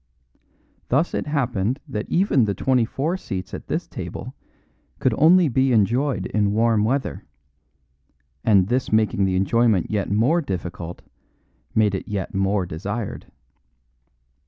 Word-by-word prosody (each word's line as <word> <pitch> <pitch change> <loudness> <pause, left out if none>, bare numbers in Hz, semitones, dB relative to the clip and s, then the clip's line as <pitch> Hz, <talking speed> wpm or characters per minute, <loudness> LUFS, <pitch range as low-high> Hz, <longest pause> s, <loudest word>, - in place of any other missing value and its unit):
Thus 145 +7 +1
it - - -2
happened 125 -4 -1
that 110 -6 -5
even 170 - +3
the 100 -2 -1
twenty 125 +3 +2
four 155 +10 -2
seats 95 - -6
at - - -7
this - - -2
table - - -7 0.6
could - - +1
only 175 +3 +5
be 130 0 +2
enjoyed 115 0 +1
in 105 0 0
warm 110 -1 +2
weather; 130 +5 -1 1.2
and 100 -5 +4
this 125 +3 -1
making 110 -2 +2
the 95 -1 0
enjoyment 105 +1 +2
yet 105 -2 -1
more 125 +12 +2
difficult 90 - -6 0.7
made 105 -2 +3
it 95 - -4
yet 100 -1 -4
more 95 0 +1
desired. 100 +6 -5
110 Hz, 135 wpm, -22 LUFS, 95-130 Hz, 1.2 s, only